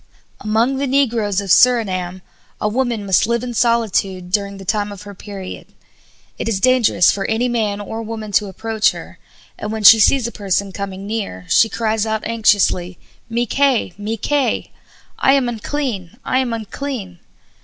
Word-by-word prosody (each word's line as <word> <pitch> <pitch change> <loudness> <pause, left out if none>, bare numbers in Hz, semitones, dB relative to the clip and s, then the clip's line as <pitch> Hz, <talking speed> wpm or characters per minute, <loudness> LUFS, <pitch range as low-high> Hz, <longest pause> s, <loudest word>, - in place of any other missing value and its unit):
Among 225 +5 +1
the 280 +1 -1
negroes 230 -7 +1
of 195 -2 -3
Surinam 185 -8 +3 0.4
a - - 0
woman 235 -2 -1
must 190 +1 +3
live 235 0 0
in 245 -1 -4
solitude 205 -6 0
during 200 0 -1
the 195 - -10
time 205 +1 -1
of 200 0 -9
her 205 0 -10
period; 195 -1 -9 0.7
it - - -2
is 205 -4 0
dangerous 240 -7 +4
for 195 - -3
any 225 +3 0
man 215 -4 -1
or 220 +2 -5
woman 220 -1 -6
to 205 +1 +2
approach 220 +3 0
her, - - -11 0.4
and 210 - -4
when 220 -1 -4
she 215 +2 +9
sees 250 +3 +4
a 235 - -3
person 200 -1 -1
coming 195 0 -6
near 200 - -4
she 225 - +4
cries 220 -1 -1
out 220 0 -2
anxiously: 200 -5 +2 0.3
"Mi 235 +1 0
kay! 265 -6 +1
Mi 210 +2 -4
kay!" 285 +4 -1 0.5
I 270 - +4
am 270 -3 +2
unclean! 230 - -4
I 255 - +1
am 255 -2 -1
unclean! 220 -4 -5
215 Hz, 170 wpm, -19 LUFS, 200-235 Hz, 0.7 s, she